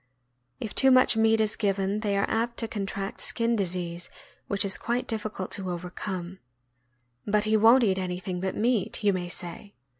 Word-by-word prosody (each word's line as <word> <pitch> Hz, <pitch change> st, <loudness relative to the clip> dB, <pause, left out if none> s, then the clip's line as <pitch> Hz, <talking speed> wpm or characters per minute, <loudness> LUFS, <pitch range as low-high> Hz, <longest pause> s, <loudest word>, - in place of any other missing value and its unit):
If 220 Hz, -, -5 dB
too 270 Hz, -, +5 dB
much 255 Hz, -2 st, +6 dB
meat 225 Hz, 0 st, +3 dB
is 215 Hz, -1 st, +1 dB
given, 195 Hz, 0 st, 0 dB
they 205 Hz, -2 st, 0 dB
are 200 Hz, -, +1 dB
apt 235 Hz, +1 st, -1 dB
to 225 Hz, -, -2 dB
contract 195 Hz, -2 st, -4 dB
skin 230 Hz, 0 st, +1 dB
disease, 175 Hz, -3 st, -2 dB, 0.4 s
which 200 Hz, -1 st, 0 dB
is 195 Hz, -, -1 dB
quite 240 Hz, +2 st, -1 dB
difficult 215 Hz, -4 st, -4 dB
to 190 Hz, -2 st, -3 dB
overcome. 180 Hz, +1 st, -5 dB, 0.9 s
"But 210 Hz, 0 st, +2 dB
he 215 Hz, 0 st, +2 dB
won't 230 Hz, +4 st, +6 dB
eat 190 Hz, -3 st, +2 dB
anything 180 Hz, 0 st, -3 dB
but 190 Hz, 0 st, -2 dB
meat," 225 Hz, -2 st, 0 dB
you 200 Hz, -1 st, +4 dB
may 175 Hz, -1 st, -3 dB
say. 175 Hz, +4 st, -6 dB
200 Hz, 175 wpm, -27 LUFS, 185-225 Hz, 0.9 s, much